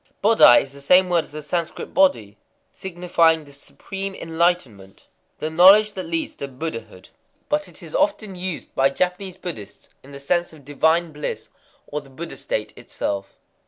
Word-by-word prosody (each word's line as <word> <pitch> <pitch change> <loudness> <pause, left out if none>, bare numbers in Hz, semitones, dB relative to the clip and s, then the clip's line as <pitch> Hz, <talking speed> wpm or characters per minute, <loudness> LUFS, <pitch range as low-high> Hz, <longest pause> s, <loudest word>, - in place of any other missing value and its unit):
Bodai 215 - +7
is 140 - -13
the 140 - -12
same 180 +6 +5
word 170 -3 +2
as - - -17
the 150 0 -7
Sanscrit 170 +2 -4
Bodhi, 115 - +2 0.4
signifying 170 -3 +1
the 145 - -16
supreme 195 +7 -7
enlightenment,—the 160 - -3
knowledge 195 +6 +7
that 185 -3 -6
leads 165 -1 -2
to 140 - -6
Buddhahood; 125 - -7 0.4
but 200 0 0
it 175 0 -13
is 160 - -10
often 265 -10 0
used 180 -2 -6
by 135 +1 +3
Japanese 180 +5 -2
Buddhists 110 - -9
in 140 - -15
the 140 - -9
sense 175 +5 -1
of 145 -4 -16
divine 160 +4 +1
bliss, 150 0 -6 0.4
or 150 - -5
the 140 - -18
Buddha 165 +6 -8
state 110 0 -4
itself. 100 -1 -5
165 Hz, 160 wpm, -22 LUFS, 140-180 Hz, 0.4 s, Bodai